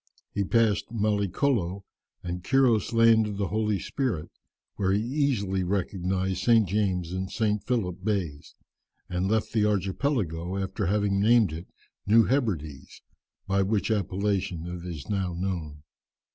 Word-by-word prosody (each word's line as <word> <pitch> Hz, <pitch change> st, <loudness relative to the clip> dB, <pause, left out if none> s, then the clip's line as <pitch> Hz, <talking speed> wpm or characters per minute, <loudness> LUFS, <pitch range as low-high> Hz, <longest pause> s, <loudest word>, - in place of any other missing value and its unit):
He 100 Hz, -, 0 dB
passed 110 Hz, +1 st, +1 dB
Mallicolo 100 Hz, -2 st, 0 dB, 0.4 s
and 90 Hz, 0 st, -4 dB
Quiros' 125 Hz, -4 st, +3 dB
Land 115 Hz, -1 st, +5 dB
of 105 Hz, -1 st, -5 dB
the 100 Hz, -3 st, -1 dB
Holy 105 Hz, -1 st, 0 dB
Spirit, 115 Hz, -, -3 dB, 0.4 s
where 95 Hz, -2 st, 0 dB
he 100 Hz, -, +2 dB
easily 120 Hz, -8 st, 0 dB
recognized 95 Hz, 0 st, -1 dB
St. 115 Hz, -4 st, +4 dB
James 90 Hz, -3 st, 0 dB
and 95 Hz, 0 st, -3 dB
St. 105 Hz, -3 st, 0 dB
Philip 95 Hz, -8 st, -1 dB
Bays, 90 Hz, -9 st, -3 dB, 0.5 s
and 90 Hz, +2 st, -1 dB
left 110 Hz, 0 st, 0 dB
this 110 Hz, -2 st, +2 dB
archipelago 95 Hz, -, -1 dB
after 100 Hz, +1 st, -2 dB
having 100 Hz, 0 st, +1 dB
named 110 Hz, -5 st, +4 dB
it 85 Hz, +3 st, -7 dB, 0.4 s
New 115 Hz, +3 st, +6 dB
Hebrides, 90 Hz, -, -2 dB, 0.4 s
by 100 Hz, 0 st, +1 dB
which 100 Hz, +3 st, 0 dB
appellation 95 Hz, -4 st, -1 dB
it 90 Hz, 0 st, -6 dB
is 80 Hz, -5 st, -7 dB
now 95 Hz, -4 st, -1 dB
known. 85 Hz, -5 st, -4 dB
100 Hz, 135 wpm, -27 LUFS, 90-110 Hz, 0.5 s, New